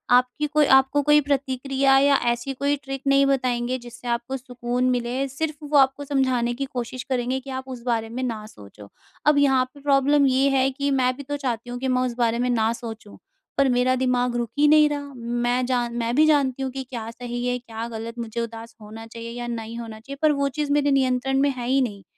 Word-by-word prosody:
आपकी 250 Hz, +4 st, +1 dB
कोई 300 Hz, 0 st, +3 dB
आपको 265 Hz, +2 st, +4 dB
कोई 295 Hz, +1 st, +5 dB
प्रतिक्रिया 270 Hz, -1 st, +1 dB
या 280 Hz, 0 st, +4 dB
ऐसी 240 Hz, +3 st, -1 dB
कोई 280 Hz, +2 st, 0 dB
ट्रिक 270 Hz, -1 st, -5 dB
नहीं 275 Hz, 0 st, +5 dB
बताएँगे, 255 Hz, -2 st, 0 dB
जिससे 240 Hz, 0 st, -11 dB
आपको 240 Hz, +3 st, -2 dB
सुकून 250 Hz, -1 st, -3 dB
मिले, 250 Hz, +2 st, -1 dB
सिर्फ़ 300 Hz, +3 st, -3 dB
वो 295 Hz, 0 st, +1 dB
आपको 270 Hz, +1 st, +3 dB
समझाने 260 Hz, -4 st, +1 dB
की 275 Hz, +3 st, -3 dB
कोशिश 255 Hz, -1 st, -5 dB
करेंगे 255 Hz, 0 st, 0 dB
कि 270 Hz, +1 st, -12 dB
आप 260 Hz, -, -5 dB
उस 250 Hz, -2 st, -7 dB
बारे 225 Hz, -2 st, -1 dB
में 250 Hz, +3 st, -4 dB
न 225 Hz, -4 st, -3 dB
सोचो। 100 Hz, -, -14 dB, 0.4 s
अब 300 Hz, -1 st, +5 dB
यहाँ 270 Hz, -2 st, +4 dB
पे 285 Hz, -, -14 dB
प्रॉब्लम 280 Hz, 0 st, +3 dB
ये 265 Hz, +1 st, +3 dB
है 270 Hz, -1 st, +2 dB
कि 280 Hz, +1 st, -2 dB
मैं 255 Hz, 0 st, +2 dB
भी 280 Hz, -, -7 dB
तो 290 Hz, +2 st, -4 dB
चाहती 245 Hz, -4 st, -3 dB
हूँ 245 Hz, -, -4 dB
कि 265 Hz, -, -2 dB
मैं 255 Hz, 0 st, +2 dB
उस 250 Hz, -1 st, -1 dB
बारे 235 Hz, -1 st, +1 dB
में 250 Hz, 0 st, 0 dB
न 225 Hz, -2 st, +2 dB
सोचूँ। 225 Hz, -3 st, -9 dB, 0.4 s
पर 275 Hz, -1 st, +4 dB
मेरा 250 Hz, +1 st, +2 dB
दिमाग 250 Hz, -1 st, 0 dB
रुक 240 Hz, -2 st, -1 dB
ही 295 Hz, -, +6 dB
नहीं 305 Hz, 0 st, +6 dB
रहा, 285 Hz, -1 st, -5 dB
मैं 240 Hz, +1 st, -1 dB
जान 245 Hz, -2 st, -1 dB
मैं 235 Hz, 0 st, -1 dB
भी 305 Hz, +3 st, +5 dB
जानती 275 Hz, -4 st, +2 dB
हूँ 265 Hz, -, -2 dB
कि 265 Hz, +1 st, -5 dB
क्या 230 Hz, -3 st, -5 dB
सही 240 Hz, 0 st, -5 dB
है, 250 Hz, 0 st, 0 dB
क्या 230 Hz, -1 st, -6 dB
गलत, 230 Hz, +1 st, -7 dB
मुझे 235 Hz, 0 st, -4 dB
उदास 230 Hz, 0 st, -7 dB
होना 220 Hz, +2 st, -10 dB
चाहिए 230 Hz, 0 st, -8 dB
या 240 Hz, -, -4 dB
नहीं 230 Hz, -1 st, -5 dB
होना 225 Hz, -2 st, -8 dB
चाहिए, 275 Hz, +5 st, -9 dB
पर 310 Hz, -1 st, +5 dB
वो 280 Hz, -1 st, 0 dB
चीज़ 295 Hz, -1 st, -1 dB
मेरे 290 Hz, 0 st, +2 dB
नियंत्रण 270 Hz, 0 st, +1 dB
में 285 Hz, -, +3 dB
है 245 Hz, -2 st, -5 dB
ही 270 Hz, +1 st, +3 dB
नहीं। 205 Hz, -5 st, -3 dB
255 Hz, 225 wpm, -24 LUFS, 240-275 Hz, 0.4 s, ही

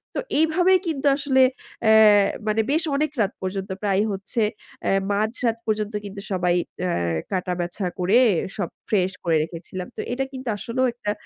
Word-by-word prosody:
তো -, -, 0 dB, 0.2 s
এইভাবেই 355 Hz, +4 st, +4 dB
কিন্তু 290 Hz, -3 st, -2 dB
আসলে 270 Hz, -2 st, +2 dB, 0.4 s
অ্যা 220 Hz, -, +5 dB, 0.6 s
মানে 215 Hz, +1 st, +2 dB
বেশ 320 Hz, +4 st, +2 dB
অনেক 305 Hz, 0 st, 0 dB
রাত 200 Hz, +1 st, +1 dB
পর্যন্ত 190 Hz, +1 st, -4 dB
প্রায় 200 Hz, -1 st, +2 dB
হচ্ছে 200 Hz, +4 st, -3 dB, 0.4 s
অ্যা -, -, +1 dB, 0.2 s
মাঝরাত 225 Hz, +3 st, 0 dB
পর্যন্ত 215 Hz, 0 st, -1 dB
কিন্তু 200 Hz, 0 st, -7 dB
সবাই 180 Hz, -1 st, +1 dB, 0.3 s
অ্যা 180 Hz, -, 0 dB, 0.4 s
কাটা 180 Hz, -1 st, -1 dB
বাছা 175 Hz, +3 st, -3 dB
করে 190 Hz, +6 st, +3 dB, 0.4 s
সব 200 Hz, -, -2 dB, 0.2 s
ফ্রেশ 190 Hz, -3 st, +2 dB
করে 165 Hz, -2 st, +2 dB
রেখেছিলাম 175 Hz, +2 st, -7 dB
তো -, -, -2 dB
এটা 270 Hz, +2 st, -1 dB
কিন্তু 260 Hz, -1 st, -8 dB
আসলেও 255 Hz, +5 st, -1 dB
একটা 210 Hz, -4 st, -3 dB
210 Hz, 160 wpm, -23 LUFS, 190-260 Hz, 0.6 s, অ্যা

